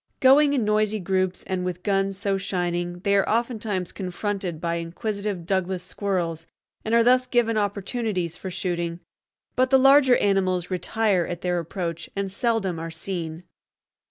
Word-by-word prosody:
Going 280 +2 +6
in 250 -6 +1
noisy 215 0 +1
groups, 185 0 -1
and 185 -1 -2
with 180 -1 -4
guns 195 -1 0
so 195 -1 0
shining, 175 -2 -2
they 200 +1 +2
are 195 - +2
oftentimes 220 -5 -1
confronted 190 -2 -3
by 170 0 -1
inquisitive 200 +2 -4
Douglas 185 -1 -1
squirrels, 170 -5 -2 0.4
and 225 +1 +1
are 235 - +6
thus 255 +1 +4
given 240 -2 +2
opportunities 205 -3 -1
for 190 - -6
shooting; 170 -1 -3 0.5
but 255 0 +3
the 265 - +6
larger 270 -1 +6
animals 185 -3 +1
retire 190 0 +1
at 175 -1 -5
their 180 -1 0
approach 170 0 -4
and 200 -1 -2
seldom 200 -5 0
are 165 0 -5
seen. 165 -1 -5
190 Hz, 155 wpm, -24 LUFS, 175-215 Hz, 0.5 s, Going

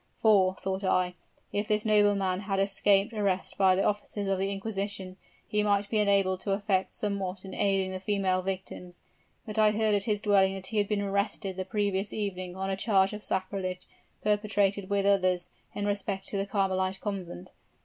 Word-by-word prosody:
'For,' 195 -4 +4
thought 190 +1 -3
I, 185 -1 +1 0.4
'if 205 +1 -1
this 210 0 0
nobleman 205 -3 +3
has 195 -1 -2
escaped 195 +2 +2
arrest 200 -3 -1
by 190 -1 +4
the 195 - +1
officers 205 0 -2
of 195 -1 0
the 195 +1 0
inquisition, 195 -2 -4 0.3
he 210 - +1
might 205 -1 +1
be 220 - +2
enabled 195 -2 +2
to 195 +1 -1
effect 195 -2 0
somewhat 195 -2 -3
in 190 - -8
aiding 195 -1 +1
the 185 - -4
female 190 -1 0
victims.' 185 -1 -6 0.4
But 215 0 -3
I 215 -1 +6
heard 215 0 +1
at 200 -1 +2
his 210 -2 0
dwelling 195 -2 +3
that 190 -1 -7
he 215 +2 0
had 205 - +1
been 205 -1 0
arrested 200 -1 -1
the 185 0 -4
previous 200 -1 -1
evening 185 -4 -4
on 190 0 -2
a - - 0
charge 195 -1 +2
of 210 0 -7
sacrilege, 185 -1 -3 0.4
perpetrated 205 -2 +1
with 200 -1 +1
others, 185 -3 +2 0.2
in 205 - -2
respect 200 -1 -2
to 200 - -3
the 195 +1 -1
Carmelite 190 -1 0
Convent. 185 - -5
195 Hz, 185 wpm, -29 LUFS, 190-205 Hz, 0.4 s, I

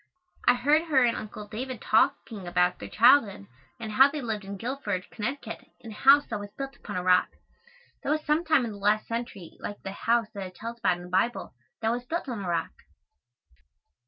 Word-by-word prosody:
I 245 - +7
heard 295 +6 +3
her 280 -6 +3
and 235 -1 +2
Uncle 210 0 -7
David 245 +3 -5
talking 215 -3 +1
about 180 +1 +1
their - - -8
childhood 230 - +4 0.3
and 220 -2 -5
how 265 +6 +6
they 300 +1 -5
lived 220 -5 -3
in 200 +1 -7
Guilford, 215 -5 -3
Conn., 240 +6 -2 0.4
in 225 - -10
a - - -8
house 275 +6 +6
that 215 - -4
was 205 0 -7
built 275 0 -5
upon - - -8
a 180 - -2
rock. 180 0 +4 0.7
That - - -4
was 305 +1 0
some 305 +3 +2
time 315 -6 +3
in 225 - -4
the 205 - -9
last 210 +2 +2
century 230 -7 -6
like 205 - -7
the 195 - -5
house 230 +2 0
that 195 -2 -5
it 185 - -15
tells 230 +2 -7
about 185 -6 +2
in 175 - -10
the 180 - -10
Bible 190 +6 0 0.3
that 225 - +2
was 245 +1 -2
built 335 +2 -3
on 230 -6 -4
a 180 - -3
rock. 170 - -1
225 Hz, 215 wpm, -27 LUFS, 200-260 Hz, 0.7 s, I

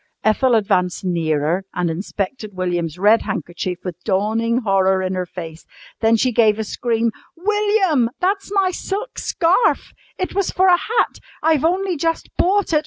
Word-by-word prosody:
Ethel 240 +3 +3
advanced 185 -4 +1
nearer 165 0 0
and 175 -2 0
inspected 200 +4 -5
William's 175 -3 -2
red 210 +4 +4
handkerchief 175 -1 -4
with 180 -1 -6
dawning 225 +4 0
horror 190 -3 +2
in 185 0 -2
her 185 -1 -2
face. 165 -2 -8 0.4
Then 225 0 +4
she 255 +3 +1
gave 220 -3 +3
a 220 - -2
scream. 230 +1 -1 0.3
"William, 395 - +2
that's 390 +2 -1
my 390 -2 +2
silk 405 +6 -4
scarf! 350 +8 +1 0.2
It 370 - -3
was 395 -1 0
for 375 +1 +3
a - - +7
hat. 455 +6 0 0.2
I've 315 -3 +3
only 365 +1 +1
just 330 +2 -2
bought 390 -1 +1
it. 305 - +5
225 Hz, 160 wpm, -20 LUFS, -, 0.4 s, a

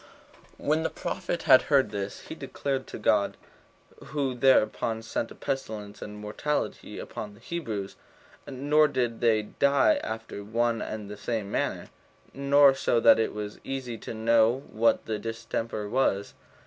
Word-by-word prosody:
3. - - -13
When 155 +2 +2
the 160 - 0
prophet 170 - -4
had 130 - +7
heard 140 -3 +4
this, 100 -1 -4
he - - -8
declared 135 -2 -3
it - - -21
to - - -7
God; - - +2 0.7
who 140 -4 -1
thereupon 115 -3 +2
sent 115 0 -3
a - - -11
pestilence 110 -6 -5
and 105 - -7
a - - -9
mortality 110 +8 -3
upon 105 -1 -7
the - - -18
Hebrews; 115 - -5 0.5
nor 145 +3 +3
did 120 -5 -1
they 110 -2 +3
die 140 - +3
after 110 -2 -5
one 115 +2 0
and 110 -2 -5
the 105 0 -8
same 105 -1 -3
manner, - - -2 0.4
nor 140 0 +5
so 125 -3 +1
that 115 - +6
it 110 - +1
was 105 -1 -6
easy 125 -4 -5
to - - -7
know 115 +3 +3
what 115 +2 +2
the 110 -1 -2
distemper 115 -1 -4
was. 100 - 0
115 Hz, 160 wpm, -27 LUFS, 105-135 Hz, 0.7 s, had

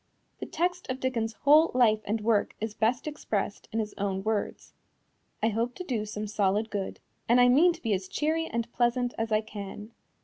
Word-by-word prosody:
The - - -5
text 355 +1 -2
of 255 0 -2
Dickens's 230 -4 -1
whole 305 +3 +6
life 220 -4 +4
and 215 +2 -1
work 215 -1 +1
is 220 0 -3
best 230 +3 0
expressed 215 -9 -3
in 225 - -3
his 215 -2 -2
own 195 -1 -1
words: 215 -1 -3 0.7
"I 225 - +4
hope 230 +3 -1
to - - -6
do 230 -9 -2
some 210 0 -4
solid 210 +1 0
good, 200 -2 -4 0.3
and 240 +1 +6
I 245 0 +6
mean 310 +8 +6
to 335 0 -9
be 225 -3 +1
as 190 -1 -2
cheery 320 +6 -1
and 235 0 -3
pleasant 245 0 +1
as 225 0 -2
I 215 0 +3
can." 210 0 -8
225 Hz, 200 wpm, -28 LUFS, 210-255 Hz, 0.7 s, whole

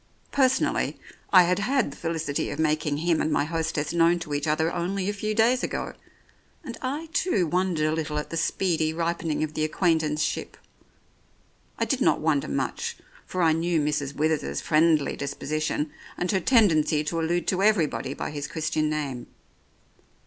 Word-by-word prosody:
Personally, 260 -2 +1 0.3
I 185 -2 +8
had 180 +2 +1
had 245 - +1
the - - -10
felicity 165 -3 -2
of - - -5
making 155 -2 0
him 165 +1 +1
and 155 - 0
my 145 - +2
hostess 155 -1 -2
known 170 0 +4
to 150 -2 -5
each 145 +1 -1
other 160 +2 +1
only 185 +2 -2
a 205 - 0
few 215 +1 -3
days 235 +3 +3
ago, - - -3 0.7
and 235 - -6
I 290 +5 -3
too 205 - +1
wondered 175 -2 0
a 155 - +1
little 155 -1 -2
at 150 - -4
the - - -3
speedy 165 -1 0
ripening 165 -2 -1
of 155 0 -3
the 155 - -1
acquaintanceship. 155 -2 0 1.2
I - - +1
did 275 -3 -1
not - - +3
wonder 150 -3 +1
much, 70 - -2 0.3
for 185 -1 -1
I 160 - +5
knew 165 +1 +1
Mrs. 145 -2 -1
Withers's 155 +1 0
friendly 155 -2 +2
disposition, 150 +1 -2 0.3
and 180 - -1
her 195 - +2
tendency 165 - +3
to 165 +2 -2
allude 175 +2 0
to 185 0 0
everybody 170 -9 +1
by - - -4
his 145 -1 -4
Christian 155 -1 -1
name. 140 -5 -3
160 Hz, 170 wpm, -26 LUFS, 150-180 Hz, 1.2 s, I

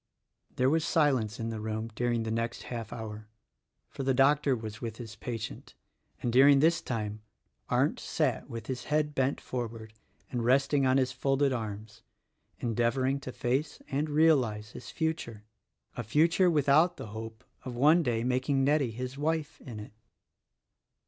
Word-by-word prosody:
There 130 - +2
was 160 +3 +2
silence 130 -11 +1
in 115 0 -2
the 110 -1 -4
room 110 +1 -3
during 120 0 0
the 110 - -3
next 115 +1 -2
half 115 -3 -6
hour, 110 -1 -7 0.6
for - - -7
the 135 -1 +1
doctor 140 +1 +4
was 110 -1 -7
with 115 -2 -5
his 110 -3 -8
patient; 115 +1 -6 0.5
and 120 - 0
during 140 +2 +7
this 165 +3 +3
time 110 -3 -4 0.5
Arndt - - +2
sat - - -1
with 115 -1 -6
his 125 -1 -5
head 150 0 0
bent 135 0 0
forward 115 -3 -5 0.4
and 120 -2 -2
resting 135 +2 +3
on 130 +1 +4
his 130 -2 +1
folded 135 +2 +1
arms, 110 -2 -6 0.6
endeavoring 120 +4 0
to 130 - -7
face 135 +5 -1
and 145 +3 -1
realize 130 -9 +2
his 125 - -10
future 140 -8 -3 0.5
—a - - -3
future 165 - +3
without 155 +3 +3
the 110 - -7
hope 110 +1 -8 0.2
of 125 -2 -6
one 150 +7 +5
day 115 -6 0
making 130 +2 +1
Nettie 140 -2 +2
his 125 +4 -6
wife, 155 0 -2
in 115 -6 -8
it. 105 - -9
125 Hz, 160 wpm, -30 LUFS, 115-140 Hz, 0.6 s, during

